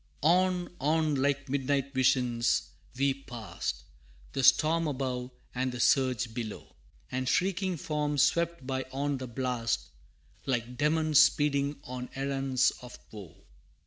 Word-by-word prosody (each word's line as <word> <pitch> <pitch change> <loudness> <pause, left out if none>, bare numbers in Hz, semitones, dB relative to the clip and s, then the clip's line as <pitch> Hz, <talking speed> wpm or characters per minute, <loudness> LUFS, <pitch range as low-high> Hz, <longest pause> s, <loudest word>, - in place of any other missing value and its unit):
V. - - -37 0.2
On, 180 0 +2
on, 155 +1 +2
like 140 0 0
midnight 140 0 -1
visions, 125 -2 +2 0.3
we 140 0 +2
passed, 115 - -6 0.5
The 135 - -1
storm 160 +5 +4
above, 130 -3 -3 0.2
and 130 +1 -1
the 125 - -6
surge 125 -3 +2
below, 110 -3 -6 0.4
And 130 0 -1
shrieking 185 +1 0
forms 150 -2 0
swept 170 -4 0
by 130 0 -2
on 140 0 -1
the 130 - -5
blast, 120 - -2 0.6
Like 125 -1 -1
demons 155 +2 +3
speeding 145 -2 +3
on 125 -2 -6
errands 135 -1 +1
of 125 0 -10
woe. 100 -8 -11
135 Hz, 130 wpm, -29 LUFS, 125-150 Hz, 0.6 s, storm